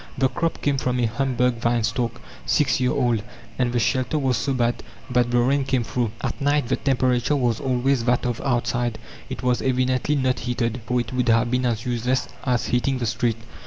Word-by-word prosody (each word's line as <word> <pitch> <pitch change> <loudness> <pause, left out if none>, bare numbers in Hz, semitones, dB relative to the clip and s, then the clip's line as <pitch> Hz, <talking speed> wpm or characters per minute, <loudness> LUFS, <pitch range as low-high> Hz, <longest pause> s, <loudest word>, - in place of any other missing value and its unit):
The 135 -1 +3
crop 165 +6 -2
came 140 -2 +1
from 125 -1 -1
a 120 - +2
Hamburg 125 +1 0
vine 120 0 +1
stalk, 115 +1 -1 0.3
six 145 - +2
year 125 -1 +2
old. 120 -6 +1 0.4
And 125 -1 +2
the 120 - 0
shelter 130 +4 +1
was 135 -3 +1
so 135 +5 -1
bad 120 -2 0 0.3
that 125 -1 +2
the 120 - +2
rain 135 +3 +3
came 130 -2 0
through. 120 0 -1
At - - -3
night 145 -2 +1
the - - +3
temperature 130 0 +1
was 120 -5 +1
always 130 -1 +1
that 125 0 +2
of 120 -2 -2
outside. 120 -3 0 0.3
It - - -6
was 125 -1 +1
evidently 130 +2 +1
not 130 -2 +1
heated, 120 0 -2
for 125 -1 +1
it 120 0 -4
would 125 -1 +1
have 115 +1 +3
been 125 0 +1
as 115 0 -2
useless 125 +1 0 0.2
as 125 -3 0
heating 125 +2 +1
the 125 - -2
street! 115 0 0
125 Hz, 205 wpm, -23 LUFS, 120-130 Hz, 0.4 s, The